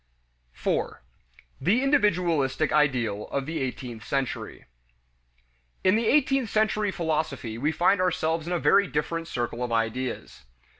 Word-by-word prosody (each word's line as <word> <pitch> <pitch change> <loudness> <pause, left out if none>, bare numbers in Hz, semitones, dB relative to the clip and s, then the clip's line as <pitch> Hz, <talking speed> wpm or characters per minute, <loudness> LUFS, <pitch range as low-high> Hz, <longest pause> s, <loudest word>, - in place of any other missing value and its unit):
4. - - -2 0.6
The 230 +8 +2
"Individualistic" 170 - +2
Ideal 125 -9 +1
of 140 -1 -3
the 160 +2 -3
Eighteenth 125 -3 -5
Century. 135 -2 -3 1.2
In 185 +1 +4
the 225 0 +1
eighteenth 270 -4 +2
century 215 -1 +1
philosophy 155 -10 -2
we 150 +5 +1
find 180 +4 +2
ourselves 165 -2 0
in 180 - -1
a - - +2
very 200 +3 +4
different 165 +2 -2
circle 120 -2 -3
of 120 - -3
ideas. 115 - -3
160 Hz, 130 wpm, -26 LUFS, 130-190 Hz, 1.2 s, In